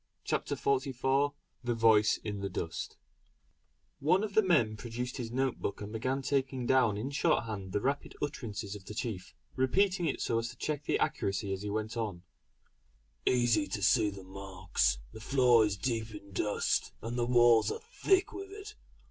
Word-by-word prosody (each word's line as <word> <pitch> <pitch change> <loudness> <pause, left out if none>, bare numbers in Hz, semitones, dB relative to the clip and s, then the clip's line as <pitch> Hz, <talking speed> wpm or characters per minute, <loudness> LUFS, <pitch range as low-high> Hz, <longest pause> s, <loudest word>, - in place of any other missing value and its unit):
CHAPTER - - -1
XLIV 135 +1 +1 0.3
THE 120 -1 0
VOICE 110 -2 +5
IN 105 -2 -4
THE 100 0 -3
DUST 85 -2 -4 1.0
One 180 +7 +3
of 210 -2 -3
the 220 - +6
men 145 - +3
produced 120 +4 -5
his 115 -3 -4
note 130 +1 0
book 100 - -3
and 105 +1 -7
began 130 +4 -1
taking 130 -2 0
down 120 -5 +3
in 125 +7 -3
shorthand 110 -8 0
the 100 - 0
rapid 140 +4 -2
utterances 110 -8 -4
of 100 - -10
the 105 - -8
chief, 100 -5 -4 0.2
repeating 180 +7 +2
it 145 - -1
so 115 - +1
as 115 0 -3
to 125 - -11
check 150 +1 -3
the - - +2
accuracy 100 0 -1
as 95 - -4
he 105 - -4
went 110 +2 -3
on: 100 -6 -3 1.0
"Easy 125 +4 +3
to 105 -4 -4
see 100 +3 +4
the 100 -1 -9
marks; 95 -6 -1 0.2
the 110 - -9
floor 125 -1 +5
is 100 -2 -3
deep 115 -2 -2
in 100 -1 -11
dust, 105 +2 0
and 115 +2 -3
the 120 -1 0
walls 120 -2 +5
are 455 - -5 0.2
thick 385 0 +3
with 395 0 -7
it. 410 +1 -9
120 Hz, 180 wpm, -31 LUFS, 105-135 Hz, 1.0 s, the